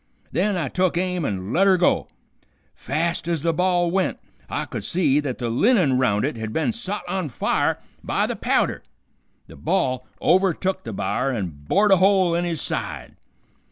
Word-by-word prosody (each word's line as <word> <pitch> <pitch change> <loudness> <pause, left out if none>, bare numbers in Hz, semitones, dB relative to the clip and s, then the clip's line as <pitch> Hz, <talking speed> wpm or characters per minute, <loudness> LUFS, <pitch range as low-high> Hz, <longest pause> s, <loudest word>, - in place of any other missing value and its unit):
Then 190 +6 +1
I 160 -6 -1
took 180 +4 0
aim 180 -1 -1
an' 95 -1 -3
let 195 +3 +4
her 190 -1 +5
go. 175 - +2 0.7
Fast 165 +4 -2
ez 165 -4 -1
the 165 -1 +2
ball 175 0 +1
went, 190 +1 0 0.3
I - - -2
could - - -6
see 150 -6 +2
that 140 -4 -3
the 120 - -3
linen 155 - +3
round 105 -4 +2
it 145 -4 -3
had 110 -1 -4
been 160 - 0
sot 210 -3 -4
on 185 -5 -2
fire 120 - 0 0.2
by - - 0
the - - -3
powder. - - 0 0.6
The - - -14
ball 130 -1 -1
overtook 190 +1 +1
the - - -4
b'ar 135 - -1
and 85 - -5
bored 205 +1 +3
a 195 - +7
hole 190 -2 +4
in 170 +1 0
his 165 -4 -1
side. - - -4
170 Hz, 180 wpm, -23 LUFS, 135-185 Hz, 0.7 s, a